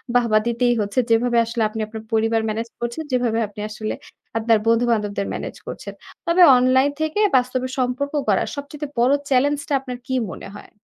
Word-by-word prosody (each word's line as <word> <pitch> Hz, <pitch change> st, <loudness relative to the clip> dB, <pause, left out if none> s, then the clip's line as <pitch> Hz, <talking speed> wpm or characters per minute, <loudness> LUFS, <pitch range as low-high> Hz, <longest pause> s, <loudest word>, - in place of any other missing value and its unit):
বাহবা 235 Hz, -3 st, +4 dB
দিতেই 240 Hz, +1 st, +2 dB
হচ্ছে, 205 Hz, +4 st, -1 dB
যেভাবে 240 Hz, +1 st, +3 dB
আসলে 230 Hz, 0 st, -3 dB
আপনি 220 Hz, -, -6 dB
আপনার 220 Hz, 0 st, -8 dB
পরিবার 225 Hz, 0 st, +2 dB
manage 225 Hz, +2 st, -3 dB
করছেন, 240 Hz, +6 st, -3 dB
যেভাবে 240 Hz, -3 st, +1 dB
আপনি 205 Hz, +1 st, -13 dB
আসলে 215 Hz, 0 st, -4 dB, 0.4 s
আপনার 225 Hz, 0 st, +3 dB
বন্ধুবান্ধবদের 225 Hz, -4 st, +1 dB
manage -, -, -6 dB
করছেন। -, -, -7 dB, 0.3 s
তবে 340 Hz, +2 st, +4 dB, 0.2 s
অনলাইন 260 Hz, +3 st, +3 dB
থেকে 315 Hz, +6 st, -1 dB, 0.2 s
বাস্তবে 255 Hz, +1 st, -1 dB
সম্পর্ক 255 Hz, +3 st, -1 dB
করার 200 Hz, -3 st, +2 dB
সবচাইতে 285 Hz, +1 st, -6 dB
বড় 250 Hz, +3 st, +4 dB, 0.2 s
challenge 285 Hz, +2 st, +2 dB
টা -, -, 0 dB
আপনার 250 Hz, -2 st, -6 dB
কি 260 Hz, -, -1 dB, 0.2 s
মনে 195 Hz, -, -9 dB
হয়? -, -, -14 dB
240 Hz, 170 wpm, -21 LUFS, 225-260 Hz, 0.4 s, বাহবা